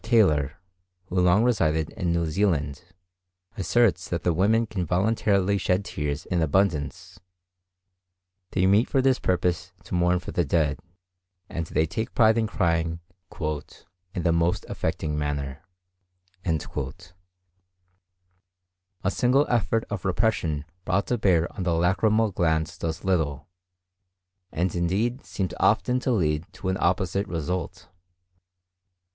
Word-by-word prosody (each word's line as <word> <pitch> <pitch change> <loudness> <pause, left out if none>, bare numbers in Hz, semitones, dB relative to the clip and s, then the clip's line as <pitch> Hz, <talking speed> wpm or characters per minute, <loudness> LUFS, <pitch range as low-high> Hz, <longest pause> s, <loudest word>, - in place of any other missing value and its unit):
Taylor, 80 - +3 0.5
who 90 0 +1
long 90 +5 +4
resided 80 -10 +1
in 90 -2 -2
New 85 0 +1
Zealand, 80 -4 0 0.7
asserts 100 -2 +2
that 85 - -2
the 90 - +2
women 110 +7 +3
can 105 -4 -3
voluntarily 100 +2 +1
shed 95 +2 0
tears 75 +2 -3
in 90 -2 0
abundance; 90 +1 0 1.3
they 95 0 +1
meet 100 +5 +4
for 135 - +2
this 130 -1 +3
purpose 90 -1 0
to - - -9
mourn 90 0 +3
for 90 - -6
the 90 - +1
dead, 75 -1 +1 0.7
and 85 -1 -4
they 80 - +1
take 110 +9 -4
pride 110 -2 +5
in 115 -1 +1
crying 85 -3 0 0.4
"in 85 +4 -6
the 85 - +3
most 85 +1 +1
affecting 75 -1 -2
manner." 70 -2 -3 0.8
A 80 -3 +2 2.5
single 130 +6 +3
effort 115 -1 +1
of 105 - -3
repression 95 -7 0 0.2
brought 95 +2 +1
to 125 - 0
bear 85 -5 +3
on - - -5
the 90 -2 +1
lacrymal 105 +5 +2
glands 80 -3 0
does 80 -1 -3
little, 75 -6 0 1.0
and 85 +2 -1
indeed 100 +9 0
seems 95 -2 -3
often 125 +1 +3
to 130 - -2
lead 80 -7 0
to 95 - -4
an 95 - 0
opposite 95 +2 0
result. 90 +2 -4
90 Hz, 130 wpm, -25 LUFS, 80-100 Hz, 2.5 s, pride